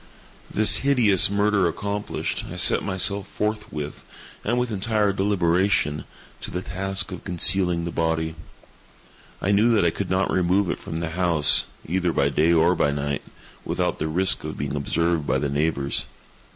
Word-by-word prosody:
This 110 0 +4
hideous 120 -10 +4
murder 100 -2 +1
accomplished, 100 +4 -4
I - - -7
set - - +4
myself 100 +1 0
forthwith, 105 -10 -4 0.4
and 120 +3 -1
with 125 -1 -1
entire 105 0 0
deliberation, 90 -5 0 0.4
to - - -7
the 90 +1 -5
task 95 +1 -3
of 90 - -8
concealing 90 -1 +2
the 85 - -4
body. 80 -1 -1 1.1
I 100 - +1
knew 105 +4 +3
that 100 - +2
I 85 - +3
could 100 +2 -5
not 95 +1 0
remove 90 0 +1
it - - -5
from 80 - -6
the 85 - -3
house, 85 -4 +3 0.2
either 90 +1 -1
by - - +1
day 80 +2 +2
or 85 +1 +4
by 80 - +1
night, 70 0 -3 0.4
without - - -2
the 80 - -2
risk 95 +4 +2
of - - -6
being - - -4
observed 85 +2 -1
by - - +1
the 70 - -2
neighbors. 70 -1 -1
90 Hz, 165 wpm, -23 LUFS, 80-100 Hz, 1.1 s, This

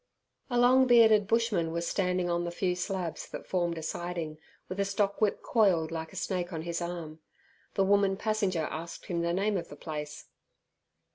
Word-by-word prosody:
A 245 - 0
long 255 +2 +5
bearded 220 -4 +6
bushman 220 -8 +1
was 170 +1 -2
standing 180 -2 0
on 175 0 0
the 175 - -2
few 180 +1 -1
slabs 180 -2 -3
that - - -7
formed 175 -2 -1
a 160 - -5
siding, 165 -2 -4 0.3
with 185 +2 -6
a - - +3
stockwhip 200 +1 0
coiled 185 -9 +3
like 160 -1 -5
a - - -14
snake 180 -2 -2
on 160 -2 -4
his 170 0 -3
arm. 170 -2 -5 0.6
The 195 - +3
woman 195 0 +3
passenger 200 -6 0
asked 165 +2 -6
him 175 -3 -2
the 170 0 0
name 200 +3 +1
of 170 - -4
the - - -10
place. 150 0 -6
180 Hz, 185 wpm, -30 LUFS, 170-200 Hz, 0.6 s, bearded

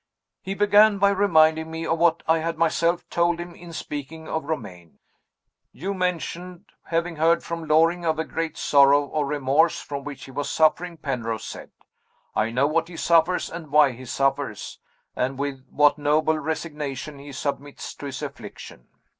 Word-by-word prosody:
"He 195 +1 -4
began 205 +1 +5
by 200 0 +4
reminding 160 -5 +3
me 160 0 -5
of 165 0 0
what 170 -1 +3
I 160 0 +4
had 165 0 -3
myself 165 +1 +1
told 170 0 +2
him 175 0 -7
in 170 0 -12
speaking 155 0 -7
of 160 -2 -3
Romayne. 90 - -6 0.7
'You 190 +7 -4
mentioned 180 0 -3 0.2
having 165 0 -2
heard 165 +2 +3
from 170 0 -4
Lord 160 -2 -9
Loring 165 +3 +3
of 160 -1 +1
a 160 - -1
great 165 -1 -4
sorrow 140 0 +5
or 145 0 -2
remorse 145 +3 +2
from 140 -1 -6
which 145 -1 -8
he 135 - -11
was 145 +2 -3
suffering,' 170 +2 +2
Penrose 115 -7 -3
said. - - -8 0.7
'I 110 - +1
know 125 +4 +2
what 165 +2 +1
he 170 -1 -10
suffers 170 +2 +3
and 165 -2 -8
why 145 -1 +5
he 125 +1 -10
suffers, 135 -3 -2 0.4
and 130 +1 -1
with 135 -2 -4
what 145 0 +3
noble 155 +2 +2
resignation 150 -2 -4
he 140 +1 -10
submits 140 +1 -5
to 145 - -8
his 135 -2 -6
affliction. - - -9
155 Hz, 170 wpm, -24 LUFS, 140-170 Hz, 0.7 s, began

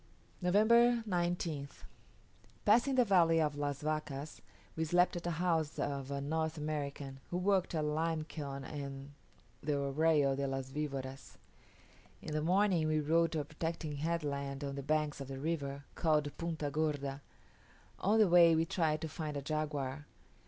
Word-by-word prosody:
November 230 +6 +5
19th. 175 -6 -2 0.8
Passing 240 +6 +4
the 250 -2 +5
valley 170 -5 +4
of 150 -2 +1
Las 145 0 -3
Vacas, 155 -1 -3 0.3
we 160 - 0
slept 175 +3 +3
at 175 0 -4
a 170 -3 -2
house 165 -3 0
of 140 -2 -2
a 140 0 -2
North 160 +3 -1
American, 145 -3 -4
who 175 - -2
worked 185 -1 +1
a 155 - 0
lime 155 +1 0
kiln 140 -3 -6
on 140 -1 -7 0.5
the 150 -1 0
Arroyo 140 0 +2
de 140 0 -1
las 135 0 -4
Vivoras. 135 -2 -5 0.8
In - - -6
the 155 - 0
morning 180 -1 +3
we 155 0 +2
rode 165 +2 +2
to 155 - 0
a - - -6
protecting 155 -1 -4
headland 140 -3 -2
on 140 -1 -3
the 140 - -4
banks 150 0 0
of 135 - -6
the 135 0 -6
river, 140 -2 -3
called 150 -3 +1
Punta 160 -4 -3
Gorda. 145 -2 -1 0.8
On 210 +3 +3
the 215 -2 +6
way 170 -2 +7
we 160 +1 +2
tried 160 -3 0
to 160 - -2
find 155 -1 -4
a - - -3
jaguar. 145 -2 -3
155 Hz, 160 wpm, -34 LUFS, 140-165 Hz, 0.8 s, way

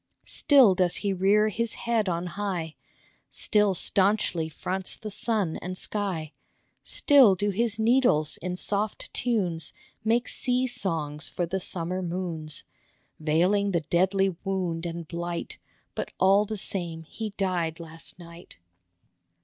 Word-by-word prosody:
Still 265 -9 +5
does 180 -1 +2
he 200 - +2
rear 200 +3 +3
his 230 +2 -2
head 225 -4 0
on 170 0 -2
high, 180 -4 -3 0.5
Still 210 -3 +2
stanchly 190 -4 +2
fronts 185 +4 -3
the 215 - -7
sun 205 -5 -1
and 185 +1 -5
sky, 180 -8 -3 0.5
Still 270 -10 +5
do 205 +3 0
his 220 +1 0
needles 220 - +3
in 180 +1 -4
soft 205 +3 -2
tunes 180 - -1 0.3
Make 230 +3 +2
sea 250 0 +1
songs 160 - -2
for 175 - -2
the 190 +3 -2
summer 180 0 -2
moons, 170 -3 -3 0.6
Veiling 180 +6 +2
the 170 - +2
deadly 190 +3 +1
wound 180 -4 -2
and 170 -1 -6
blight; 170 +1 -5 0.3
But - - -4
all 195 +2 +5
the 215 +1 -4
same 170 -4 -2
he 210 +5 -6
died 175 -4 -1
last 165 -1 -8
night. 170 0 -13
185 Hz, 135 wpm, -27 LUFS, 170-210 Hz, 0.6 s, Still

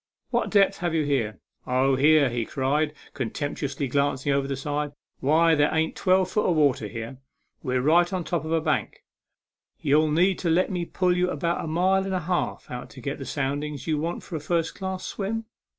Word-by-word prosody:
" - - -56
What - - +1
depths 195 -1 +3
have 175 -2 -1
you 155 -2 +1
here?" 115 -8 -1 0.2
" - - -51
Oh, 130 +1 +2
here," 150 +1 +5 0.2
cried 140 +5 0
he, - - -20 0.2
contemptuously 140 +2 -3
glanc 140 0 0
ing 145 - +2
over 140 0 0
the 135 - -2
side, 145 +1 -3 0.2
" - - -52
why, 160 +4 +4
there 145 -1 +3
ain't 160 0 0
twelve 185 0 +2
foot 210 - +1
of 175 - +2
water 140 -8 +2
here. 115 +4 -7 0.4
We're 125 0 -1
right 170 +4 +4
on 185 -2 -2
top 170 -3 -2
of 160 - -5
a 165 -1 +2
bank. 155 -1 -1 0.8
Ye'll 155 +2 +3
need 180 +5 +2
to 170 - -1
let 175 +4 +2
me 175 -2 -2
pull 180 +1 +1
you 180 0 +1
about 170 +2 -1
a - - -4
mile 185 +4 +2
and 195 -1 -2
a 180 - -1
half 175 +2 -2
out 125 0 -6
to 130 - -12
get 140 +3 -4
the 135 - -6
soundings 145 0 -3
you 155 -2 0
want 165 +3 -3
for 170 - -7
a - - -2
first 165 +2 -1
class 190 -1 -5
swim." 220 +3 -3
155 Hz, 220 wpm, -25 LUFS, 140-175 Hz, 0.8 s, here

